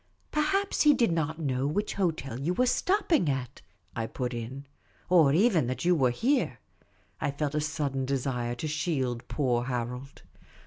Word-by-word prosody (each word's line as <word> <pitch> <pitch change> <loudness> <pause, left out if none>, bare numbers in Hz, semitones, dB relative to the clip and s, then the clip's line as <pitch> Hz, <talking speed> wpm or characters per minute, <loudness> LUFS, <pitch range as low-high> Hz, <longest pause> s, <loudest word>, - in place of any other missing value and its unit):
" - - -38
Perhaps 390 +6 +1
he 295 -1 +6
did 235 -8 +2
n't 160 -1 -1
know 135 -4 -1
which 205 +8 -1
hotel 155 - -2
you 165 +6 -1
were 250 - +3
stopping 340 - +2
at," 135 -2 -3 0.3
I 115 -1 -2
put 125 0 -3
in, 125 +4 -6 0.2
" - - -33
Or 160 -6 +6
even 175 - +3
that 130 +6 -3
you 180 - +5
were 135 -7 +3
here." 255 - 0 0.6
I - - 0
felt 145 +1 -2
a 150 - 0
sudden 145 -4 -2
desire 125 -3 -1
to 140 +6 -4
shield 135 -6 -2
poor 125 -4 0
Harold. 125 +2 -5
140 Hz, 175 wpm, -28 LUFS, 125-175 Hz, 0.6 s, he